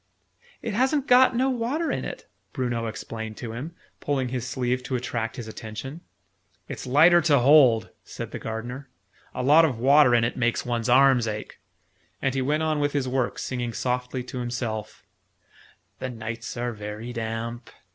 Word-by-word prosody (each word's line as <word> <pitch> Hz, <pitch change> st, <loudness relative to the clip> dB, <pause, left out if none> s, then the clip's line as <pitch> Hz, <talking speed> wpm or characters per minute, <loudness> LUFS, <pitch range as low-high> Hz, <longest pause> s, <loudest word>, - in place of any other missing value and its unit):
"It 230 Hz, -3 st, -3 dB
hasn't 265 Hz, +5 st, +1 dB
got 255 Hz, -1 st, +6 dB
no 260 Hz, +2 st, +2 dB
water 260 Hz, +7 st, -1 dB
in -, -, -2 dB
it!" -, -, -7 dB, 0.3 s
Bruno 120 Hz, -3 st, -2 dB
explained 110 Hz, 0 st, -6 dB
to 120 Hz, -3 st, -6 dB
him, 140 Hz, +9 st, -7 dB, 0.2 s
pulling 135 Hz, -3 st, -1 dB
his 125 Hz, -1 st, -3 dB
sleeve 125 Hz, 0 st, -1 dB
to 130 Hz, +1 st, -3 dB
attract 115 Hz, -2 st, -3 dB
his 120 Hz, -3 st, -7 dB
attention. 110 Hz, +8 st, -7 dB, 0.7 s
"It's -, -, -7 dB
lighter 165 Hz, +7 st, +6 dB
to 155 Hz, -3 st, +4 dB
hold," 125 Hz, -4 st, +5 dB
said -, -, -7 dB
the -, -, -5 dB
Gardener. 120 Hz, +5 st, -6 dB, 0.5 s
"A -, -, -2 dB
lot 150 Hz, +5 st, +6 dB
of 140 Hz, -7 st, +1 dB
water 130 Hz, +1 st, +5 dB
in 115 Hz, -, +3 dB
it 115 Hz, -, -1 dB
makes 120 Hz, -1 st, 0 dB
one's 120 Hz, -1 st, -1 dB
arms 130 Hz, -2 st, +5 dB
ache." 105 Hz, 0 st, -6 dB, 0.6 s
And 135 Hz, -2 st, 0 dB
he 135 Hz, -, 0 dB
went 150 Hz, +4 st, 0 dB
on 155 Hz, -1 st, 0 dB
with 145 Hz, 0 st, 0 dB
his 140 Hz, -3 st, 0 dB
work, 130 Hz, -1 st, -1 dB
singing 120 Hz, -2 st, -3 dB
softly 125 Hz, +2 st, -2 dB
to 125 Hz, 0 st, -6 dB
himself, 120 Hz, -3 st, -4 dB, 1.0 s
"The 130 Hz, -, -3 dB
nights 115 Hz, 0 st, -6 dB
are 120 Hz, 0 st, -2 dB
very 105 Hz, +3 st, -7 dB
damp!" 115 Hz, +1 st, -4 dB
125 Hz, 170 wpm, -25 LUFS, 115-145 Hz, 1.0 s, got